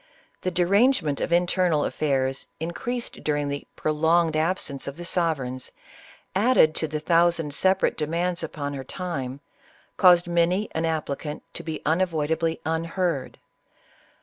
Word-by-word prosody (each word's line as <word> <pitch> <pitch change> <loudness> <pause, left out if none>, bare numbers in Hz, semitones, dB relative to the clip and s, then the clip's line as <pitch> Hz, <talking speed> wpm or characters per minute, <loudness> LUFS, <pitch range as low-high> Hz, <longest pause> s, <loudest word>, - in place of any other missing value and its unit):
The 185 - 0
derange 200 +9 +3
ment 145 -2 -2
of - - -2
internal 175 -3 +2
affairs, 135 -3 -1
increased 235 +10 -4
during 145 -1 0
the 140 0 -5
prolonged 160 +1 +2
absence 155 -3 -1
of 140 +2 -6
the 175 - -7
sovereigns, 140 -8 -1 0.6
added 200 -6 +4
to 160 - -1
the 155 0 -3
thousand 165 -1 +2
sepa 190 +5 +2
rate - - +2
demands 170 +3 -1
upon 145 -3 -4
her 135 -1 -5
time, 140 -5 -5 0.6
caused 175 -2 +6
many 175 +4 +1
an 160 +1 -1
applicant 150 -2 -3
to - - -6
be 160 -2 -6
unavoidably 160 -1 0
unheard. 165 -2 -1
165 Hz, 135 wpm, -25 LUFS, 150-175 Hz, 0.6 s, caused